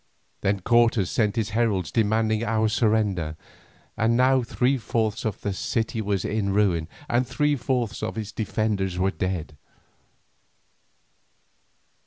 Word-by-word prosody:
Then 100 -1 0
Cortes 115 -3 +3
sent 110 -6 +1
his 110 -2 -1
heralds 105 -8 0
demanding 110 0 +1
our 110 -1 +1
surrender, 105 -8 +1 0.6
and 115 +2 +2
now 130 +1 +4
three 125 +3 0
fourths 110 -1 -1
of 110 -3 -3
the 100 - -2
city 110 +3 -2
was 100 -3 -1
a 110 +1 -1
ruin, 100 -5 +1 0.2
and 120 +1 +1
three 145 +4 +1
fourths 125 -3 -2
of 110 - -3
its 110 -1 -4
defenders 105 -4 -1
were 95 +1 +1
dead. 90 -6 -3
110 Hz, 130 wpm, -25 LUFS, 100-115 Hz, 0.6 s, now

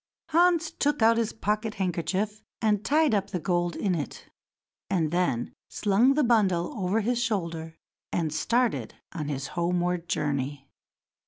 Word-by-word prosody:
Hans 335 -1 +3
took 290 -5 0
out 230 +1 +5
his 230 -2 0
pocket 215 0 -2
handkerchief 195 +3 -1 0.2
and 210 -2 +1
tied 305 -3 +3
up 200 -1 +1
the 185 - -2
gold 175 0 0
in 195 -3 0
it, 150 -5 -5 0.6
and 165 -6 +1
then 175 -9 0 0.2
slung 225 +7 +3
the 300 - +3
bundle 200 -8 +2
over 200 +1 0
his 240 +3 0
shoulder, 165 -7 -3 0.3
and 160 -3 -1
started 235 +8 0 0.2
on 155 -5 -4
his 140 -2 -3
homeward 175 0 -1
journey. 140 -1 -2
195 Hz, 145 wpm, -27 LUFS, 170-225 Hz, 0.6 s, out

